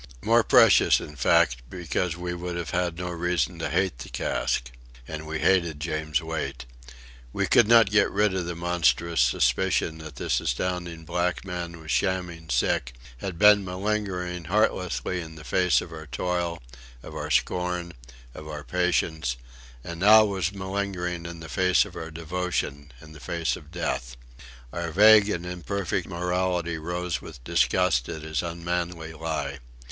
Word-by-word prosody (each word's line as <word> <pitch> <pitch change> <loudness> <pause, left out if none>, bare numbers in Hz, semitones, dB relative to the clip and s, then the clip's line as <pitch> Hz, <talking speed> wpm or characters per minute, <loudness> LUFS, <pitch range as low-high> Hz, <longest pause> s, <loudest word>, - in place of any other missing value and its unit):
More 115 +1 +4
precious, - - +6
in 75 - -9
fact, - - +3
because 90 -1 -2
we 90 0 -4
would 90 0 -5
have 85 -1 -4
had 90 -1 -1
no 90 0 -4
reason 85 -4 -1
to - - -2
hate 95 -10 0
the - - -8
cask. - - -1 0.4
And 80 0 -6
we 80 +1 -3
hated 85 -1 +2
James 80 0 -1
Wait. 80 -6 -4 0.7
We - - 0
could 115 - +5
not 115 -3 +6
get 105 - +4
rid 105 -1 +2
of 90 -2 -2
the 85 - -4
monstrous 85 -3 +1
suspicion 80 +7 +1
that 80 -2 -9
this - - 0
astounding 85 +4 -3
black 90 +2 -1
man 85 -2 -5
was 80 -1 -7
shamming 90 -4 -1
sick, - - 0 0.2
had 90 +6 -5
been 105 +1 +6
malingering 90 -2 -3
heartlessly 90 -1 0
in 80 -1 -9
the 80 - -11
face 90 +6 +2
of 85 - -9
our 80 -1 -9
toil, 85 +3 -2 0.4
of - - -9
our - - -5
scorn, 90 -1 0 0.4
of 75 - -10
our 75 -1 -6
patience 80 -3 0 0.5
and 85 0 -7
now 110 +3 +7
was 95 -4 -1
malingering 95 -3 -3
in 85 -1 -8
the 80 - -8
face 90 +2 +3
of - - -12
our 80 - -6
devotion 80 -3 -3
in 75 - -13
the 75 - -12
face 85 +2 -2
of 75 - -13
death. 60 -8 -3 0.6
Our 85 -1 -3
vague 105 +4 +7
and 85 -4 -2
imperfect 90 0 -3
morality 90 -1 -1
rose 90 +1 -3
with 70 -7 -11
disgust 80 -4 +2
at 80 - -6
his 80 -2 -2
unmanly 85 -1 -3
lie. 80 -4 -4
85 Hz, 160 wpm, -26 LUFS, 80-90 Hz, 0.7 s, now